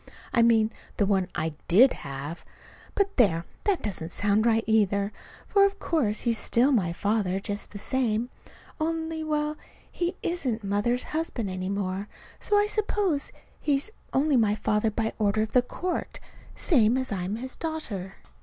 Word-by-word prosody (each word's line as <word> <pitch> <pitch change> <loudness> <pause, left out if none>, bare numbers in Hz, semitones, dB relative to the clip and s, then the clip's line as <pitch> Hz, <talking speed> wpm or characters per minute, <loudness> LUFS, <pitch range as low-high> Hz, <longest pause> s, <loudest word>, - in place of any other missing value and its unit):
I 235 - +5
mean 225 -1 +4 0.3
the 205 - +3
one 195 -2 +2
I 160 -2 -1
did 245 +9 +6
have. 140 +4 -7 0.5
But, 400 -1 0
there! 170 -9 +3 0.2
that 400 -4 +1
doesn't 170 -5 -3
sound 205 +4 +2
right, 225 -1 +3
either; 205 -2 +2 0.3
for 400 - +4
of 400 0 +2
course 255 - 0
he's 230 -2 +1
still 250 +5 +3
my 195 -10 +2
father 200 0 0
just 205 +1 -4
the 205 - -8
same, 240 +1 0 0.5
only 320 0 -2
well, 300 0 -1 0.3
he 350 +1 -2
isn't 260 -11 -2
Mother's 205 +5 +1
husband 285 - -3
any 185 0 -3
more, 200 0 -2 0.3
so 415 - +2
I 410 - +4
suppose 415 -7 0 0.3
he's 290 +7 0 0.2
only 280 0 +3
my 210 -3 +3
father 215 +1 +1
by 220 +1 -2
order 215 0 +2
of 220 - -5
the 250 - +5
court, 355 +8 -4 0.4
same 245 - +3
as 260 -2 -2
I'm 190 +1 -2
his 255 +3 -5
daughter. 220 - -4
225 Hz, 160 wpm, -27 LUFS, 200-300 Hz, 0.5 s, did